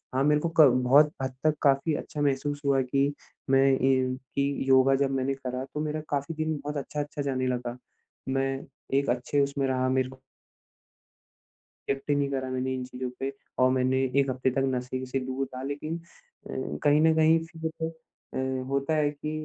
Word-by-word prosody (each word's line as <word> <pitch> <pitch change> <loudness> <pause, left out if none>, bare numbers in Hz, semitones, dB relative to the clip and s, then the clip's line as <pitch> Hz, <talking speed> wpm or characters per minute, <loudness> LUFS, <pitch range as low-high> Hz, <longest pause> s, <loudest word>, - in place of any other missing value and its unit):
हाँ, 135 - +3
मेरे 150 0 +3
को 170 - 0
क - - +12 0.2
बहुत 145 +4 +6
हद 130 -1 -2
तक 155 -1 +3
काफ़ी 140 +2 +3
अच्छा 145 0 -5
महसूस 145 +1 0
हुआ 135 -1 +3
कि, 140 +2 +1 0.4
मैं 135 0 +5
कि 130 - +1
ये 130 -1 +2 0.2
कि 140 -1 0
योगा 135 +1 +6
जब 135 0 +1
मैंने 135 +1 0
करा, 130 -1 -4
तो 150 - -7
मेरा 155 0 -2
काफ़ी 140 +3 -1
दिन 155 0 -1
बहुत 150 +1 -3
अच्छा-अच्छा 145 +1 -4
जाने 130 -2 -1
लगा। 125 -1 -2 0.5
मैं 135 0 0 0.4
एक 140 - +1
अच्छे 125 +4 +1
उसमें 140 -1 -1
रहा 130 -1 +1
मेरे 130 0 +1
को 130 0 -14 1.7
रिएक्ट 140 +1 -2
ही - - +5
नहीं 140 -1 0
करा 130 -1 -2
मैंने 130 0 -1
इन 130 -1 -3
चीज़ों 125 0 -5
पे 135 +1 -2 0.3
और 130 0 +5
मैंने 130 0 +2 0.2
1 135 -1 +1
हफ़्ते 130 0 0
तक, 135 +1 0
नशे 125 +1 -3
से 135 +1 -2
दूर 130 +1 -3
रहा। 130 - -5
लेकिन 150 +4 -4
अ, 480 - -14 0.3
कहीं 145 +1 +5
न 160 0 +5
कहीं 160 +1 +5
फिर 160 -1 -5 0.6
अ, - - -2 0.3
होता 140 +3 0
है 145 -1 +2
कि 150 +1 -6
135 Hz, 190 wpm, -27 LUFS, 130-145 Hz, 1.7 s, क